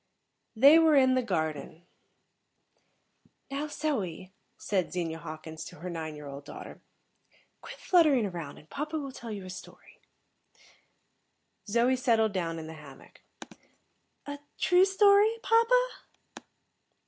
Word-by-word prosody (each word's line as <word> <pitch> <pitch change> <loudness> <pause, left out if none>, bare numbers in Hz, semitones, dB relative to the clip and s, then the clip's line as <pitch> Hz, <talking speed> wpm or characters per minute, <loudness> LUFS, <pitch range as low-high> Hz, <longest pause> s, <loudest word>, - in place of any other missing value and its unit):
_ - - -49 0.6
They 300 +4 +9
were 320 -2 +5
in 260 -2 +5
the 255 - +2
garden. 160 - -3 1.7
"Now, 285 +2 -3
Zoe," 210 - -3 0.2
said 190 -4 -1
Zenia 165 -2 -3
Hawkins 155 +1 -8
to - - -10
her 175 +3 -7
nine 160 -2 -5
year 150 0 -10
old 140 0 -8
daughter, - - -10 0.8
"quit - - -9
fluttering 305 - +3
around, 170 -7 -6
and 155 - -16
papa 305 - -4
will 280 -3 -5
tell 235 -2 -9
you 200 -3 -6
a - - -9
story." 185 - -13 1.7
Zoe 240 +4 +3
settled 225 -5 +2
down 165 -3 -2
in 160 - -7
the 160 - -8
hammock. 145 -4 -15 1.0
"A 285 0 -6 0.2
true 360 +1 +4
story, 405 +3 +4
papa?" 480 +2 +3
220 Hz, 130 wpm, -29 LUFS, -, 1.7 s, They